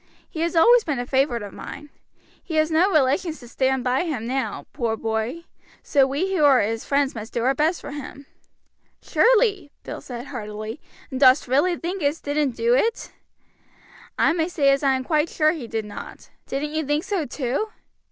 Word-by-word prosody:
He 315 Hz, -, -8 dB
has 335 Hz, +1 st, -1 dB
always 465 Hz, +8 st, +6 dB
been 295 Hz, -4 st, -2 dB
a 245 Hz, -, -3 dB
favorite 260 Hz, -3 st, +1 dB
of 200 Hz, -, -8 dB
mine. 295 Hz, -1 st, -9 dB, 0.5 s
He 325 Hz, -, -5 dB
has 310 Hz, +1 st, +2 dB
no 340 Hz, +5 st, +4 dB
relations 310 Hz, +1 st, +1 dB
to 245 Hz, -, -12 dB
stand 260 Hz, +1 st, 0 dB
by 250 Hz, +1 st, +1 dB
him 275 Hz, -9 st, -3 dB
now, 265 Hz, +2 st, -3 dB
poor 230 Hz, -5 st, -1 dB
boy, 225 Hz, +9 st, -3 dB, 0.4 s
so 275 Hz, -3 st, +3 dB
we 330 Hz, +9 st, -1 dB
who 315 Hz, -, +2 dB
are 275 Hz, -3 st, +6 dB
his 225 Hz, +2 st, -1 dB
friends 280 Hz, -1 st, +1 dB
must 220 Hz, -1 st, -8 dB
do 235 Hz, -, -1 dB
our 265 Hz, +2 st, +3 dB
best 315 Hz, +5 st, +1 dB
for -, -, -8 dB
him." 285 Hz, -1 st, -8 dB, 0.8 s
"Surely," 430 Hz, -9 st, +3 dB
Bill -, -, -7 dB
said 245 Hz, -1 st, -7 dB
heartily; 215 Hz, -1 st, -6 dB, 0.3 s
"and 260 Hz, -, -3 dB
dost 260 Hz, 0 st, +5 dB
really 290 Hz, +8 st, +2 dB
think 360 Hz, +3 st, -4 dB
as 290 Hz, +2 st, +1 dB
he -, -, -25 dB
didn't 285 Hz, -3 st, 0 dB
do 235 Hz, +1 st, +2 dB
it?" 445 Hz, -, 0 dB, 1.1 s
"I -, -, +3 dB
may 330 Hz, -1 st, 0 dB
say 280 Hz, -6 st, +3 dB
I 275 Hz, -1 st, +1 dB
am 260 Hz, -, -3 dB
quite 305 Hz, +3 st, +1 dB
sure 310 Hz, -1 st, +2 dB
he 305 Hz, -8 st, -6 dB
did 225 Hz, -1 st, -3 dB
not, 210 Hz, -, -10 dB, 0.2 s
Bill. 270 Hz, -, -1 dB
Didn't 300 Hz, 0 st, -4 dB
you 315 Hz, 0 st, 0 dB
think 295 Hz, +2 st, 0 dB
so 385 Hz, -6 st, -2 dB
too?" 275 Hz, -, -2 dB
280 Hz, 200 wpm, -23 LUFS, 250-320 Hz, 1.1 s, always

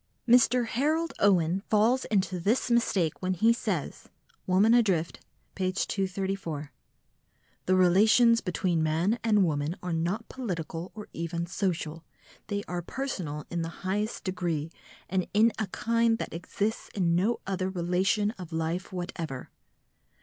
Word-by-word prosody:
Mr. 245 Hz, 0 st, +5 dB
Harold 310 Hz, +8 st, 0 dB
Owen 185 Hz, -2 st, +3 dB
falls 225 Hz, +5 st, +3 dB
into 190 Hz, -3 st, 0 dB
this 225 Hz, +7 st, +1 dB
mistake 195 Hz, -9 st, +1 dB
when 185 Hz, 0 st, 0 dB
he 225 Hz, +6 st, +4 dB
says 195 Hz, -10 st, -3 dB, 0.4 s
(Woman 195 Hz, +5 st, +4 dB
Adrift, 195 Hz, -9 st, +2 dB, 0.3 s
p. 185 Hz, -1 st, -1 dB
234): 190 Hz, -6 st, -2 dB, 1.0 s
"The 185 Hz, -, +4 dB
relations 215 Hz, +6 st, +5 dB
between 180 Hz, -3 st, 0 dB
man 165 Hz, +9 st, +1 dB
and 210 Hz, -4 st, +4 dB
woman 150 Hz, +1 st, -1 dB
are 180 Hz, -1 st, -2 dB
not 175 Hz, +8 st, -1 dB
political 175 Hz, -8 st, -5 dB
or 210 Hz, -1 st, -8 dB
even 170 Hz, +1 st, -3 dB
social, 165 Hz, -3 st, -2 dB, 0.4 s
they 205 Hz, -1 st, -2 dB
are 175 Hz, 0 st, -3 dB
personal 170 Hz, -, -4 dB
in 175 Hz, -1 st, -1 dB
the 165 Hz, +3 st, -7 dB
highest 210 Hz, +4 st, -1 dB
degree, 170 Hz, -4 st, -2 dB, 0.4 s
and 185 Hz, 0 st, -1 dB
in 220 Hz, +2 st, +5 dB
a 215 Hz, -, -1 dB
kind 230 Hz, +3 st, +1 dB
that -, -, -5 dB
exists 205 Hz, +6 st, -3 dB
in 175 Hz, -4 st, +2 dB
no 200 Hz, +8 st, +1 dB
other 190 Hz, -1 st, -1 dB
relation 190 Hz, +4 st, +1 dB
of 175 Hz, -2 st, -8 dB
life 165 Hz, +3 st, -2 dB
whatever." 175 Hz, -7 st, -5 dB
185 Hz, 135 wpm, -28 LUFS, 170-215 Hz, 1.0 s, Mr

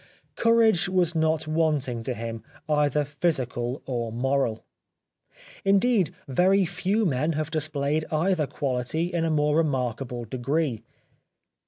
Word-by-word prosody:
Courage 225 Hz, -6 st, +3 dB
was 180 Hz, -3 st, +2 dB
not 160 Hz, -1 st, +1 dB
wanting 150 Hz, -7 st, 0 dB
to 125 Hz, +2 st, -3 dB
him, 115 Hz, 0 st, -5 dB, 0.3 s
either 150 Hz, -1 st, +2 dB
physical 135 Hz, -5 st, -2 dB
or 120 Hz, -3 st, -3 dB
moral. 125 Hz, -1 st, 0 dB, 1.0 s
Indeed 195 Hz, -1 st, +3 dB, 0.2 s
very 185 Hz, +8 st, +3 dB
few 200 Hz, +6 st, 0 dB
men 155 Hz, 0 st, +1 dB
have 155 Hz, +1 st, -3 dB
displayed 155 Hz, -1 st, -1 dB
either 160 Hz, -1 st, +1 dB
quality 140 Hz, +6 st, -2 dB
in 165 Hz, -1 st, 0 dB
a -, -, +1 dB
more 150 Hz, -1 st, +2 dB
remarkable 125 Hz, -5 st, -1 dB
degree. 130 Hz, +1 st, -1 dB
150 Hz, 120 wpm, -26 LUFS, 130-165 Hz, 1.0 s, Courage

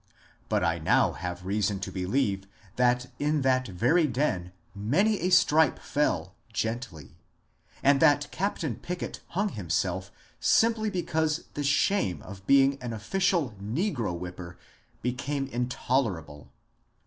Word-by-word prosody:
But -, -, +1 dB
I -, -, +1 dB
now -, -, +3 dB
have 90 Hz, -1 st, -6 dB
reason 100 Hz, 0 st, 0 dB
to -, -, -4 dB
believe 95 Hz, +1 st, -1 dB, 0.3 s
that 125 Hz, 0 st, +2 dB
in 150 Hz, 0 st, +1 dB
that 130 Hz, -2 st, +2 dB
lonely 160 Hz, -, +4 dB
den 120 Hz, -10 st, -1 dB, 0.2 s
many 155 Hz, -, +1 dB
a 180 Hz, -, 0 dB
stripe 160 Hz, -4 st, +4 dB
fell 95 Hz, -, -1 dB, 0.2 s
gently, 110 Hz, -, -4 dB, 0.7 s
and 140 Hz, 0 st, +5 dB
that 145 Hz, -1 st, +4 dB
Captain 165 Hz, -, -2 dB
Pickett 180 Hz, 0 st, -5 dB, 0.2 s
hung 205 Hz, +1 st, +2 dB
himself 90 Hz, -, -2 dB, 0.3 s
simply 225 Hz, -1 st, +3 dB
because 160 Hz, -4 st, -1 dB
the 145 Hz, -, -3 dB
shame 140 Hz, -, +1 dB
of 95 Hz, -1 st, -11 dB
being 135 Hz, 0 st, +4 dB
an 120 Hz, -2 st, -4 dB
official 165 Hz, -, 0 dB
negro 115 Hz, -, -1 dB
whipper 90 Hz, 0 st, -8 dB, 0.5 s
became 135 Hz, +3 st, -2 dB
intoler 125 Hz, -4 st, 0 dB
able. 75 Hz, -1 st, -14 dB
125 Hz, 125 wpm, -28 LUFS, 95-155 Hz, 0.7 s, and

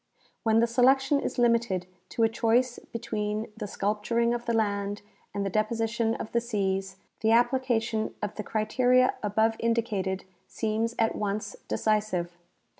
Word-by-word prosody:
When 225 Hz, -1 st, +3 dB
the -, -, +5 dB
selection 265 Hz, +4 st, +3 dB
is -, -, -4 dB
limited 235 Hz, -6 st, +2 dB, 0.2 s
to 230 Hz, -, 0 dB
a -, -, +6 dB
choice 235 Hz, +2 st, +1 dB
between 215 Hz, -2 st, -3 dB
the 215 Hz, -2 st, -5 dB
sculp 205 Hz, +1 st, -2 dB
turing 235 Hz, +1 st, +2 dB
of 240 Hz, 0 st, -4 dB
the 235 Hz, -, +1 dB
land 205 Hz, -2 st, -1 dB, 0.3 s
and 200 Hz, -1 st, -2 dB
the -, -, 0 dB
deposition 225 Hz, +2 st, 0 dB
of 220 Hz, -, -6 dB
the 235 Hz, -, +1 dB
seas, 195 Hz, -4 st, -1 dB, 0.2 s
the 220 Hz, -, +1 dB
application 230 Hz, -2 st, +1 dB
of 210 Hz, -1 st, -3 dB
the -, -, -5 dB
criteria 250 Hz, +5 st, +2 dB
above 220 Hz, +2 st, +2 dB
indicated 215 Hz, -5 st, -1 dB, 0.2 s
seems 225 Hz, +1 st, -1 dB
at 225 Hz, 0 st, +1 dB
once 205 Hz, -1 st, -3 dB
decisive. 210 Hz, -5 st, 0 dB
225 Hz, 150 wpm, -28 LUFS, 210-235 Hz, 0.3 s, a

